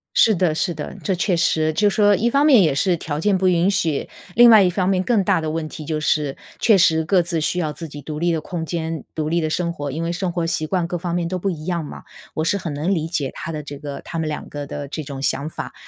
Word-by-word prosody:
是 220 - +5
的 170 -3 +1
是 175 +2 0
的。 155 +4 -7
这 190 - 0
确 180 0 +1
实， 155 -1 +2
就 205 +5 +3
说 205 0 +4
一 235 +5 +1
方 280 +4 +3
面 270 -8 +7
也 155 -6 +3
是 175 +5 +1
条 150 -2 -4
件 195 +3 +2
不 185 0 +1
允 180 +1 +3
许， 165 -8 -1 0.3
另 240 0 +8
外 220 -3 +8
一 180 - +3
方 185 +1 0
面 190 -1 +1
更 220 -2 +2
大 180 - +2
的 160 -1 -3
问 160 0 -3
题 155 - -8
就 155 0 -2
是， 150 -2 0 0.2
确 215 -4 +5
实 160 -3 +4
各 180 +2 +3
自 170 -1 -2
需 170 +3 -1
要 155 -3 -1
自 165 +2 -8
己 145 -1 -9
独 150 +1 -6
立 170 +1 +1
的 160 -2 -1
空 165 +1 -5
间、 160 -2 -3
独 155 -1 -2
立 170 +2 +1
的 155 -1 -1
生 170 +2 -1
活， 145 -4 -5
因 155 +5 -4
为 165 - -1
生 180 +1 -2
活 170 -1 -2
习 165 -2 -1
惯 175 +1 -1
各 175 - -3
方 175 0 -4
面 175 -1 -1
都 185 +2 -2
不 195 +2 -1
一 155 -4 -5
样 170 -3 -2
嘛， - - -9 0.3
我 155 - -1
是 200 - +1
很 170 -5 -5
能 155 +7 0
理 160 -3 -1
解 150 -5 -2
他 165 - -6
的 155 -1 -4
这 145 0 -8
个 140 -1 -7
他 165 - -6
们 160 - -1
两 150 - -5
个 145 -1 -6
的 140 0 -6
这 155 +3 -5
种 135 -1 -7
想 140 +1 -1
法， - - -7
165 Hz, 310 characters per minute, -21 LUFS, 155-185 Hz, 0.3 s, 另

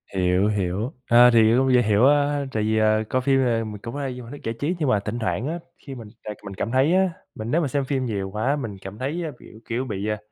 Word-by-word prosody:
Hiểu, 90 +1 +2
hiểu, 105 - -1 0.2
ờ, 120 +1 +8
thì 115 -1 +5
cũng 130 0 +3
dễ 125 - +6
hiểu 110 +1 +3
á, 145 0 +2
tại 110 -3 -1
vì, 110 +1 +1
ờ, 110 0 +3
coi 130 - +1
phim, 135 +1 +2
à, 120 -3 +1
mình 105 -2 -7
cũng 115 +2 -7
hay 140 -3 -3
như 125 - -8
một - - -12
hình 145 - -9
thức - - -25
giải 115 - -2
trí. 160 +6 -1
Nhưng 150 -4 +1
mà 105 -5 +3
thỉnh 105 +4 -4
thoảng 115 +2 -2
á, 165 +3 -3 0.3
khi 135 - -6
mình 115 -4 -9 0.2
tại 105 -1 -5
mình 100 - -6
cảm 115 - -3
thấy 135 +6 +3
á, 190 0 +3 0.3
mình 110 +2 -5
nếu 170 +3 +2
mà 150 - 0
xem 140 +1 -1
phim 130 -1 -1
nhiều 100 -5 -3
quá, 110 +8 0
mình 115 -9 -5
cảm 95 +2 -8
thấy 150 +7 -2
á, 160 - -4
kiểu 110 - -14
kiểu, 120 +3 -1
bị, 100 -4 -4
à 105 0 -1
120 Hz, 290 wpm, -23 LUFS, 105-135 Hz, 0.3 s, ờ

